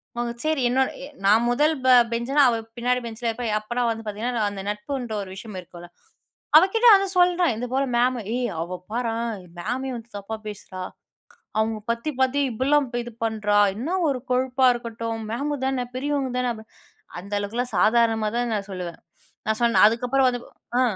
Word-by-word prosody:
அவுங்க 240 0 -2
செரி, 310 -3 +1
என்னோட 260 +2 +2
எ - - -5 0.2
நான் 215 +4 +5
1 300 +6 +3
ப - - +3 0.2
பெஞ்ச்னா, 245 +5 +1
அவ 230 - +1 0.2
பின்னாடி 250 +1 +1
பென்ஞ்ல 230 +1 -5
இருப்பா. 235 +2 -4
அப்போலாம் 240 +2 -1
வந்து 225 0 -6
பாத்தீங்கன்னா, 220 +4 -3
நா 215 - +1
அந்த 195 -1 -6
நட்புன்ற 225 +3 -4
ஒரு 195 - -7
விஷயம் 210 0 -8
இருக்குள்ல, 175 0 -12 0.7
அவகிட்ட 420 +8 +4
ஆனா 395 0 +2
சொல்றேன், 355 -5 +4
இது 245 +2 -3
போல 275 - +2
மேமு 250 +1 +2 0.2
ஏய் 245 -2 -1
அவ 175 +2 -4 0.2
பாரேன், 230 -1 -1 0.3
மேமயே 255 +7 -3
வந்து 235 +1 -12
தப்பா 200 +2 -5
பேசுறா, 190 -3 -8 0.8
அவுங்க 220 0 +1
பத்தி 235 +6 -1
பத்தி 260 +2 +2
இப்புட்லாம் 275 +5 +2 0.2
இது 240 0 -9
பண்றா, 210 -2 +1 0.2
என்ன 260 +10 -4 0.2
ஒரு 265 -2 0
கொழுப்பா 260 +1 +2
இருக்கட்டும், 230 -1 -5
மேம்மு 285 +5 -2
தானே 260 -2 -1
பெரியவங்க 280 -1 -1
தானே. 250 -1 0
அபி 220 0 -11 0.6
அந்த 200 +3 -11
அளவுக்கெல்லாம் 230 +4 -3
சாதாரணமா 225 +1 +3
தான் 240 -1 0
நான் 200 0 -4
சொல்லுவேன். 180 -3 -6 0.5
நான் 220 +1 0
சொன்னேன், 235 -2 +5
அதுக்கப்புறம் 250 +4 +2
வந்து 245 -1 -4 0.4
ஆ. - - +5
235 Hz, 170 wpm, -24 LUFS, 220-260 Hz, 0.8 s, நான்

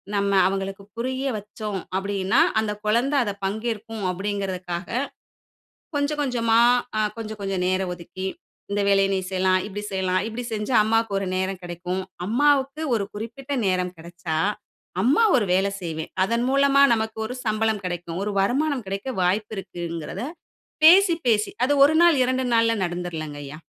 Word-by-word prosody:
நம்ம 200 0 +1
அவுங்களுக்கு 195 +1 -3
புரிய 260 +3 -2
வைச்சோம்? 210 -1 -5 0.2
அப்படின்னா, 195 -1 +1 0.2
அந்த 215 -1 -2 0.2
குழந்தை 240 +7 +2
அத 205 -3 -2
பங்கேற்கும், 220 +1 -3
அப்படிங்கிறதுக்காக, 190 -2 -4 1.1
கொஞ்சம் 290 +1 0
கொஞ்சமா 230 -4 +2 0.4
ஆ - - +2 0.2
கொஞ்சம் 220 -1 -6
கொஞ்சம் 195 -2 -1
நேரம் 185 0 0
ஒதுக்கி 185 +2 -7 0.5
இந்த 205 - +1
வேலை 195 0 +4
நீ 190 - 0
செய்யலாம், 185 0 +2
இப்படி 205 0 -6
செய்யலாம், 185 -1 +1
இப்டி 230 +2 -5
செஞ்சா, 215 +4 -2
அம்மாக்கு 225 0 +1
ஒரு 195 - -3
நேரம் 190 0 -2
கிடைக்கும். 180 +2 -4 0.2
அம்மாவுக்கு 280 +5 +2
ஒரு 205 - -1
குறிப்பிட்ட 235 +6 -6
நேரம் 180 -1 0
கெடச்சா, 170 -1 -5 0.7
அம்மா 275 - +4
ஒரு 235 - +2
வேலை 190 +2 +2
செய்வேன். 160 -2 -5
அதன் 235 +4 0
மூலமா 275 +1 +4
நமக்கு 220 0 -3
ஒரு 250 - -5
சம்பளம் 215 -1 0
கிடைக்கும். 175 -1 -4
ஒரு 210 - -1
வருமானம் 265 +5 +1
கிடைக்க 200 +7 -3
வாய்ப்பு 205 +5 0
இருக்குங்கிறத 170 -3 -5 0.6
பேசி, 360 +2 +8
பேசி 215 -3 +2
அது 285 +3 +2
1 310 +3 +4
நாள், 345 -3 +6
2 255 +1 0
நாள்ல 230 0 +4
நடந்துறலங்க 170 -4 -4
ஐயா. 140 +2 -8
205 Hz, 145 wpm, -24 LUFS, 185-235 Hz, 1.1 s, பேசி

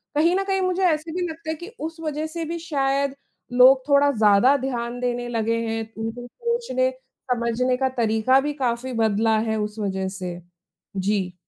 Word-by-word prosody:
कहीं 335 +4 +3
न 390 - +1
कहीं 385 -1 0
मुझे 370 0 0
ऐसे 320 -2 +1
भी 355 - 0
लगता 315 0 -8
है 320 - -1
कि 350 +7 -10
उस 325 +1 -5
वजह 310 0 -2
से 330 +1 -4
भी 335 +2 -4
शायद 275 -3 0 0.4
लोग 260 +1 +7
थोड़ा 285 0 +5
ज़्यादा 220 +3 +5
ध्यान 245 -2 -3
देने 245 -1 -2
लगे 230 0 0
हैं। 225 0 -2 0.2
उनके 235 +2 -5
सोचने, 470 - -1 0.4
समझने 245 +1 0
का 265 0 +1
तरीका 225 +4 +3
भी 295 - -1
काफ़ी 245 +1 -1
बदला 220 +1 +2
है 220 - 0
उस 210 +1 -4
वजह 190 -2 -2
से। 180 -1 -5 0.6
जी। 190 -1 0
255 Hz, 180 wpm, -23 LUFS, 225-315 Hz, 0.6 s, लोग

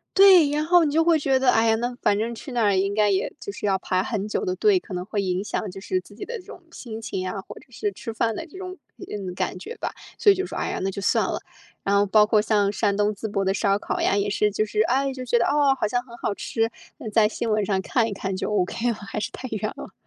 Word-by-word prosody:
对， 380 -5 +8
然 300 +1 0
后 345 +2 +5
你 300 - +1
就 325 +1 +4
会 335 -1 +4
觉 270 -3 +2
得， 260 - +3
哎 225 -1 +4
呀， 220 - +4
那 240 +2 -2
反 205 - +3
正 230 +2 -2
去 265 - -9
那 240 -1 0
儿 200 -1 +3
应 195 +1 +1
该 210 0 +3
也 190 -1 0
就 - - -6
是 205 - -6
要 195 -2 +2
排 185 +1 0
很 210 -3 -3
久 215 - -2
的 370 -1 -1
队， 415 -3 +4
可 225 - -11
能 180 0 -3
会 210 +1 -3
影 185 0 -1
响 205 -1 -3
就 195 - -9
是 185 -1 -1
自 205 - -17
己 210 - -8
的 480 0 -5
这 365 - -13
种 - - -11
心 225 -7 -8
情 185 -4 -4
啊， 195 +1 -4
或 - - -9
者 - - -14
是 415 - -2
吃 230 - -7
饭 225 0 0
的 330 - -5
这 320 - -17
种 370 0 -7 0.2
体 - - -10
验， 195 -3 -5
感 185 0 -2
觉 330 - -8
吧， - - -3 0.3
所 410 - +7
以 - - +3
就 380 0 -2
说， - - -8
哎 - - -2
呀， - - -3
那 195 - 0
就 200 - -6
算 - - +2
了。 - - -2 0.4
然 200 0 +1
后 200 - +4
包 210 +1 +5
括 215 0 +4
像 210 -1 +2
山 205 -1 0
东 210 0 +2
淄 220 - -5
博 195 -1 0
的 190 0 +1
烧 200 -1 +2
烤 - - -3
呀， - - +2
也 205 0 +1
是 210 +1 +1
就 215 - 0
是 215 0 0
哎， 270 +4 +1
就 255 -1 -6
觉 240 -1 +2
得， 235 - +2
哦， 285 -2 +3
好 - - +3
像 245 +2 -1
很 235 -2 -12
好 225 - -2
吃， 225 +2 -1 0.4
在 215 -1 +5
新 225 +1 -3
闻 215 -1 +1
上 190 -1 0
看 230 +3 +1
一 215 - -4
看 195 -1 -3
就 - - -2
okay 210 +4 0
了， - - +1
还 210 0 -6
是 210 - -3
太 255 - -7
远 215 -1 -2
了。 - - -9
215 Hz, 330 characters per minute, -24 LUFS, 200-260 Hz, 0.4 s, 对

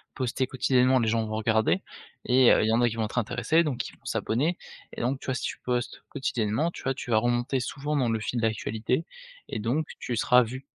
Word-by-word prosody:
poster 130 0 -1
quotidiennement 130 0 +3
les 115 - +1
gens 115 0 +1
vont 110 0 -4
regarder 110 - +2 0.4
et 125 0 +6
heu, - - +4
il 110 - +1
y - - +2
en 120 - +3
a 120 - +4
qui 115 - -6
vont 115 - -1
être 105 - -7
intéressé 125 +8 +1
donc 140 -5 -2
ils - - -17
vont - - -35
s'abonner 150 +11 0 0.4
et - - -5
donc 130 +3 0
tu - - -11
vois? 130 - +1
Si - - -3
tu - - -4
postes 125 0 -3
quotidiennement 125 +2 -1
tu - - -10
vois? 135 - 0
Tu 125 -2 -7
vas 110 - +4
remonter 120 +3 0
souvent 145 +4 -3
dans 125 -3 +2
le 110 -1 0
fil 120 - -2
d'actualité, 110 +5 -1 0.4
et - - -3
donc 130 +8 0
tu 125 - -3
seras 125 +3 +5
vu. 130 +4 -7
125 Hz, 240 wpm, -27 LUFS, 115-130 Hz, 0.4 s, et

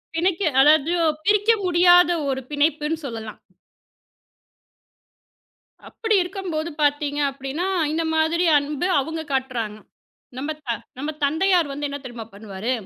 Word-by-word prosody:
தினக்கி 360 +3 0 0.2
அதாவது 310 +3 +4 0.3
பிரிக்க 415 +2 +2 0.2
முடியாத 355 0 +5 0.2
ஒரு 265 0 -2
பிணைப்புன்னு 300 +2 0
சொல்லலாம். 225 -3 -7 2.5
அப்படி 445 -2 -1
இருக்கும்போது 355 -3 -4
பார்த்தீங்க 290 0 0
அப்படின்னா, 275 +7 -4 0.2
இந்த 330 +1 -1
மாதிரி 325 +2 +2
அன்பு 290 +4 -2
அவங்க 320 +4 -3
காட்டுறாங்க. 245 -5 -2 0.6
நம்ம 290 +4 -3 0.2
த - - -6 0.3
நம்ம 290 +3 -4
தந்தையார் 330 +2 +2
வந்து 290 +1 -3
என்ன 285 - -4
தெரியுமா 235 -2 -8
பண்ணுவாரு? 200 +2 -5
300 Hz, 110 wpm, -22 LUFS, 270-345 Hz, 2.5 s, முடியாத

